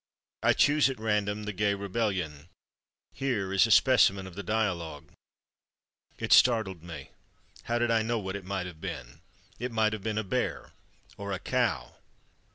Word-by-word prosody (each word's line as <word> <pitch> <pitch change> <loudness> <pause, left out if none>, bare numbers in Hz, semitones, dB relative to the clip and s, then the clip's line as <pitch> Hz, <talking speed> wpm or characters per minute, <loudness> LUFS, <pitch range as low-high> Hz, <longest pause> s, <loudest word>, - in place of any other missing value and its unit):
I - - +4
choose, 145 -1 +4
at 135 - -5
random, 105 -1 -1
"The 105 0 -4
Gay 100 +1 +1
Rebellion." 95 -7 -3 0.6
Here 115 -9 -2
is 95 +4 +5
a - - -7
specimen 100 -5 +5
of 95 - -10
the 100 - -6
dialogue: 90 -7 -2 1.1
"It - - +2
startled 110 -8 +4
me. 80 -5 -9 0.5
How 120 - 0
did 120 0 +1
I 115 -1 +3
know 115 +1 -1
what 95 -2 -4
it 100 - -6
might 95 -1 -3
have 85 -3 -10
been? 70 -10 -7 0.4
It 125 +1 -3
might 110 -1 +2
have 110 - -4
been 105 +1 -3
a 110 - 0
bear—or 100 +1 -5
a 95 - -1
cow." 115 - -1
100 Hz, 165 wpm, -29 LUFS, 95-110 Hz, 1.1 s, is